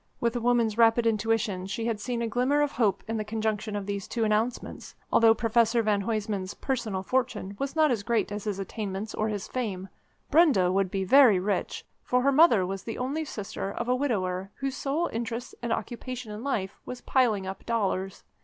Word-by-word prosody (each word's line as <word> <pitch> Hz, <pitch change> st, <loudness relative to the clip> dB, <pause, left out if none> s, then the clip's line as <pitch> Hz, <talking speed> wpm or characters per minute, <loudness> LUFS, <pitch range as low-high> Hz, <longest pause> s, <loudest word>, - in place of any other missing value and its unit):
With 235 Hz, 0 st, 0 dB
a 240 Hz, -, -1 dB
woman's 235 Hz, -2 st, +2 dB
rapid 230 Hz, 0 st, +5 dB
intuition, 215 Hz, -3 st, 0 dB
she 225 Hz, +3 st, -3 dB
had 230 Hz, -3 st, -1 dB
seen 235 Hz, +1 st, -2 dB
a -, -, 0 dB
glimmer 255 Hz, +6 st, +2 dB
of 290 Hz, -, -1 dB
hope 220 Hz, -5 st, +1 dB
in 225 Hz, 0 st, -2 dB
the 215 Hz, -, -1 dB
conjunction 215 Hz, 0 st, -2 dB
of 205 Hz, -1 st, -3 dB
these 200 Hz, -1 st, -4 dB
two 230 Hz, -, -1 dB
announcements. 220 Hz, +3 st, -2 dB, 0.2 s
Although 225 Hz, -1 st, +6 dB
Professor 230 Hz, 0 st, +2 dB
van 210 Hz, -2 st, +1 dB
Huysman's 205 Hz, -2 st, -2 dB
personal 225 Hz, -8 st, -2 dB
fortune 230 Hz, -4 st, -1 dB
was 275 Hz, +2 st, -3 dB
not 310 Hz, -3 st, +4 dB
as 230 Hz, -4 st, 0 dB
great 230 Hz, 0 st, 0 dB
as 205 Hz, 0 st, -5 dB
his 205 Hz, -3 st, -2 dB
attainments 200 Hz, +1 st, -5 dB
or 215 Hz, -, -1 dB
his 205 Hz, -2 st, -4 dB
fame, 195 Hz, -7 st, -4 dB, 0.4 s
Brenda 280 Hz, -, +5 dB
would 195 Hz, 0 st, +1 dB
be 190 Hz, +1 st, -2 dB
very 235 Hz, -2 st, +6 dB
rich, 200 Hz, +2 st, -2 dB, 0.2 s
for 250 Hz, 0 st, +1 dB
her 280 Hz, -, +4 dB
mother 270 Hz, -, +5 dB
was 195 Hz, +1 st, -4 dB
the 225 Hz, +3 st, -6 dB
only 275 Hz, +5 st, -2 dB
sister 200 Hz, -7 st, -5 dB
of -, -, -4 dB
a 250 Hz, -, +3 dB
widower 195 Hz, -8 st, -1 dB
whose 270 Hz, 0 st, -3 dB
sole 305 Hz, +5 st, -1 dB
interest 230 Hz, +1 st, -4 dB
and 235 Hz, -1 st, -3 dB
occupation 245 Hz, -1 st, -4 dB
in 210 Hz, +2 st, -7 dB
life 195 Hz, -9 st, -2 dB
was 250 Hz, -, -7 dB
piling 225 Hz, -7 st, +2 dB
up 190 Hz, +1 st, -6 dB
dollars. 195 Hz, -4 st, -1 dB
225 Hz, 200 wpm, -27 LUFS, 200-245 Hz, 0.4 s, Although